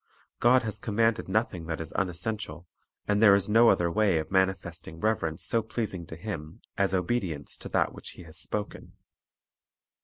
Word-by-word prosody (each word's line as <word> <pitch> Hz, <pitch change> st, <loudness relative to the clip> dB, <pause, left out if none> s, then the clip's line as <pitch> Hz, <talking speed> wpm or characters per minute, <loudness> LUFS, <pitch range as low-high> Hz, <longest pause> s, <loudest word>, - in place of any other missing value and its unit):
God 125 Hz, +1 st, +5 dB
has 110 Hz, -1 st, -3 dB
commanded 115 Hz, -1 st, +1 dB
nothing 95 Hz, -5 st, -1 dB
that 80 Hz, -2 st, -3 dB
is 80 Hz, -2 st, -6 dB
unessential, 90 Hz, -2 st, -3 dB, 0.4 s
and 105 Hz, 0 st, +2 dB
there 100 Hz, -3 st, +8 dB
is 100 Hz, -1 st, 0 dB
no 115 Hz, +2 st, +6 dB
other 85 Hz, -1 st, +2 dB
way 100 Hz, -3 st, +3 dB
of 80 Hz, -, -3 dB
mani 95 Hz, 0 st, +3 dB
festing 85 Hz, -2 st, -9 dB
reverence 90 Hz, -7 st, 0 dB
so 115 Hz, -, +2 dB
pleasing 110 Hz, -6 st, -4 dB
to -, -, -8 dB
Him 80 Hz, -4 st, -6 dB, 0.2 s
as 100 Hz, -1 st, +1 dB
obedience 90 Hz, -6 st, -2 dB
to -, -, -7 dB
that -, -, +1 dB
which -, -, -9 dB
He -, -, -10 dB
has 80 Hz, -1 st, -11 dB
spoken. 105 Hz, +4 st, -4 dB
95 Hz, 175 wpm, -28 LUFS, 85-110 Hz, 0.4 s, there